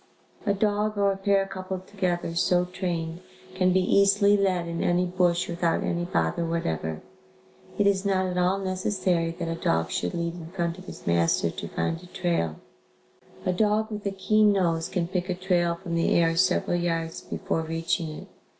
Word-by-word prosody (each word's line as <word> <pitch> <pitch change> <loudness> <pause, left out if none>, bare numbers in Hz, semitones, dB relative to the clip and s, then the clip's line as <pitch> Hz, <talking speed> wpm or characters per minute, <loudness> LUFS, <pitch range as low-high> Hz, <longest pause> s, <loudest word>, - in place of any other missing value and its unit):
A 200 - +4
dog 210 +1 0
or 200 -1 +3
a - - -2
pair 195 0 +2
coupled 185 -1 -6
together, 180 -4 -2
so 175 +1 +2
trained, 175 -2 -3 0.3
can 185 0 +2
be 185 +1 +3
easily 200 +2 +4
led 185 -4 +1
in 170 0 -3
any 175 +1 +2
bush 180 -1 +1
without 170 -1 0
any 175 0 -1
bother 85 - 0
whatever. 80 - -2 0.7
It 205 - +3
is 195 -1 +3
not 190 -2 +1
at 180 -1 -3
all 180 +2 +2
necessary 185 -3 0
that 170 - -3
a 165 - -1
dog 80 - 0
should 90 - -2
lead 170 0 -2
in 165 -2 -9
front 170 -1 -2
of 185 - -12
his - - -10
master 85 0 +2
to - - -6
find 165 - -2
a 180 - -13
trail. 170 - -1 0.9
A 185 - +2
dog 215 +3 +1
with 210 -1 -5
a - - 0
keen 210 +2 +3
nose 170 -4 +1
can 180 -3 -1
pick 180 0 -2
a 180 - 0
trail 175 -2 +1
from 170 0 -7
the 165 0 +2
air 165 -1 +3
several 180 0 +2
yards 165 -1 -2
before 165 - -2
reaching 165 0 -2
it. 155 - -8
180 Hz, 185 wpm, -26 LUFS, 170-195 Hz, 0.9 s, A